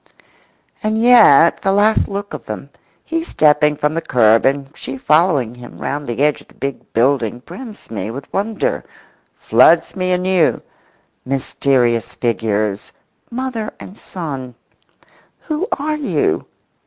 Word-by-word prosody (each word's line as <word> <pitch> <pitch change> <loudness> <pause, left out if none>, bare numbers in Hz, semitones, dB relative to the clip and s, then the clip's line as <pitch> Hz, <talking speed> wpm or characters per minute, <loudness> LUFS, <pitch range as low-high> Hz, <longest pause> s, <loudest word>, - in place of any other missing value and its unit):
And 215 +1 0
yet 225 - +6
the 195 - +1
last 205 +2 +3
look 200 +1 -5
of - - -7
them—he 330 0 -7
stepping 150 - +3
from 150 +1 -1
the 165 - -2
kerb 115 -4 +3
and 140 +2 -2
she 135 - -6
following 150 -5 +2
him 125 0 -12
round 145 +1 -4
the 120 +4 -1
edge 150 0 +1
of - - -20
the - - -22
big 135 0 -6
building 120 -1 +1
brims 215 - -11
me 105 -1 -4
with 135 +4 -8
wonder—floods 170 - 0
me 185 -1 -1
anew. 180 -2 +1 0.6
Mysterious 130 -3 0
figures! 110 -3 -1 0.4
Mother 240 -3 -4
and 190 - -11
son. 135 - -7 0.9
Who 320 +4 -3
are 305 +2 -2
you? 180 - -1
150 Hz, 130 wpm, -18 LUFS, 125-200 Hz, 0.9 s, yet